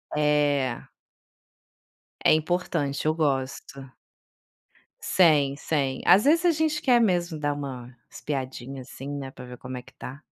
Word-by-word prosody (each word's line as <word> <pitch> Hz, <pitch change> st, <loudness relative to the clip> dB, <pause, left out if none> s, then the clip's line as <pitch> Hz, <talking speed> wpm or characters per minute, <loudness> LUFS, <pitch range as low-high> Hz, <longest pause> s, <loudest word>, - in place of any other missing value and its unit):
É. 145 Hz, -4 st, +1 dB, 1.4 s
É -, -, +6 dB
importante, 155 Hz, -3 st, -1 dB
eu 155 Hz, -, +2 dB
gosto. 135 Hz, -2 st, -2 dB, 1.1 s
Sem, 150 Hz, -6 st, +4 dB
sem. 135 Hz, -5 st, -1 dB
Às 200 Hz, +5 st, +6 dB
vezes 330 Hz, +4 st, +4 dB
a 345 Hz, -, +6 dB
gente 310 Hz, -1 st, 0 dB
quer 245 Hz, -3 st, +4 dB
mesmo 175 Hz, -5 st, +1 dB
dar 145 Hz, -1 st, 0 dB
uma 130 Hz, -4 st, -7 dB, 0.2 s
espiadinha 135 Hz, -2 st, -5 dB
assim, 135 Hz, +2 st, -9 dB
né, 140 Hz, -2 st, -5 dB
pra 125 Hz, -, -11 dB
ver 125 Hz, 0 st, -10 dB
como 130 Hz, 0 st, -8 dB
é 125 Hz, -, -6 dB
que -, -, -19 dB
tá. 135 Hz, +4 st, -9 dB
145 Hz, 140 wpm, -26 LUFS, 135-170 Hz, 1.4 s, É